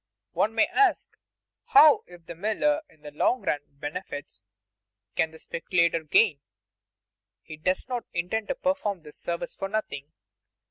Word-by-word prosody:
One 220 +2 0
may 225 - +5
ask, 410 -2 +1 0.5
How, 400 -11 +7
if 175 -2 -15
the 170 - -7
miller 220 - 0
in 155 - -25
the 150 - -8
long 245 - +1
run 145 - 0
benefits, 145 - -7 0.7
can 160 - +2
the 160 - -14
speculator 170 0 0
gain? 155 0 +3 1.0
He 155 - -9
does 185 +8 -1
not 245 -2 -3
intend 180 +5 -2
to 275 - -1
perform 220 - -1
this 150 -1 -13
service 170 0 -4
for 195 - -4
nothing. 155 -9 -4
180 Hz, 145 wpm, -27 LUFS, 155-225 Hz, 1.0 s, How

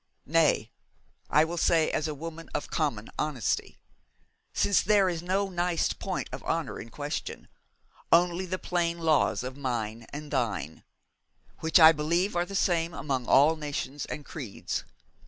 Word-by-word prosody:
Nay, 155 -7 +2 0.6
I 155 +1 +5
will 170 +1 -4
say 160 -1 +3
as 155 - -1
a 155 - -4
woman 165 +2 -8
of - - -3
common 135 -9 -1
honesty; 150 -7 -1 0.7
since 200 - +3
there 205 -1 +4
is 170 -3 -2
no 195 +3 0
nice 175 -2 0
point - - -4
of - - -6
honour - - -2
in - - -8
question, - - -5 0.6
only 175 +2 +3
the 185 +1 -2
plain 170 -2 -1
laws 160 -6 +2
of 130 +1 -5
mine 115 -4 -3
and 150 +1 -7
thine, 100 - -2 0.8
which 160 +1 +4
I 160 -1 +10
believe 170 +6 0
are 175 0 +1
the 195 - -6
same 170 -3 +1
among 130 -5 -2
all 150 +4 +6
nations 145 -2 -4
and 145 - -6
creeds. 125 -11 -5
160 Hz, 155 wpm, -28 LUFS, 140-175 Hz, 0.8 s, I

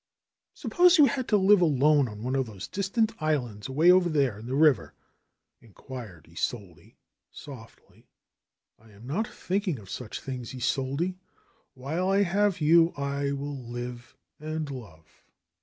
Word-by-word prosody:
^^Suppose 360 0 +4
you 300 - +8
had 265 -3 -1
to 210 - +3
live 200 0 +5
alone 145 -3 +3
on 105 +1 -9
one 130 +2 -2
of 135 -2 0
those 100 -4 -8
distant 200 +3 0
islands 125 -10 -1
away 155 +7 +5
over 180 -1 +4
there 135 -9 0
in 115 - -10
the 130 - -2
river?" 130 - +3 0.7
inquired 110 - -11
Isolde 90 +1 -5 0.4
softly. 125 -6 -13 0.8
'T 110 - -19
am 105 +4 -15
not 200 - -2
thinking 190 - -2
of 100 -4 -12
such 125 -4 -6
things, 130 -2 -7
Isolde. 135 +7 -1 0.6
While 155 +9 -2
I 195 +1 +3
have 200 0 +1
you 165 +2 +5
I 140 0 -2
will 140 +1 -4
live 120 0 -7 0.2
and 155 -1 -4
love." 85 -12 -12
140 Hz, 145 wpm, -27 LUFS, 120-175 Hz, 0.8 s, you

